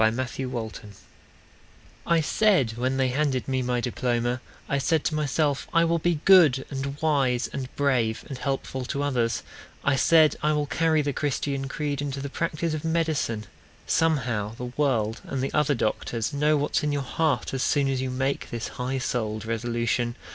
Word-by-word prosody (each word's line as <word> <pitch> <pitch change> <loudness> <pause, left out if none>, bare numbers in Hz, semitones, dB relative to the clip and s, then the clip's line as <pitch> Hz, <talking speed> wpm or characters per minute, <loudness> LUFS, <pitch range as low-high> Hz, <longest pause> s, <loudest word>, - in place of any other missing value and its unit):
Siegfried 110 +2 +3 0.3
Iseman 110 -3 -6 1.2
I 170 -1 +4
said 180 - +3
when 130 +2 -1
they 130 -1 +2
handed 135 -1 0
me 130 -1 0
my 125 -1 0
diploma, 120 0 -1 0.3
I 140 - 0
said 160 +2 +1
to - - 0
myself 150 -1 0
I 165 0 +5
will 170 0 +1
be 165 -2 0
good 160 -9 +6
And 140 +1 -4
wise 135 -6 +2
and 130 -2 -4
brave 125 -6 +1
and 135 -3 -7
helpful 135 -1 -3
to 140 +2 -2
others; 120 -5 0 0.4
I 140 - +3
said 155 +2 +5
I 150 0 +2
will 150 -1 +1
carry 155 +1 +2
the 145 -1 -1
Christian 140 -1 -2
creed 145 0 -2
Into 140 -1 -3
the 140 +1 -4
practice 165 +1 -2
of 155 0 -3
medicine! 160 -9 0 0.4
Somehow 120 -10 +1
the 125 +1 -6
world 115 -7 0
and 135 - -4
the 135 +1 -2
other 150 -1 +2
doctors 115 +1 -2
Know 150 +2 +3
what's 145 +1 0
in 150 - 0
your 145 -1 -1
heart 140 -1 0
as 135 - -1
soon 140 0 +2
as 135 -1 0
you 130 - -2
make 135 +2 -2
This 115 -1 -4
high 130 +2 -1
souled 110 -4 -2
resolution. 120 +1 -1
135 Hz, 175 wpm, -26 LUFS, 125-150 Hz, 1.2 s, good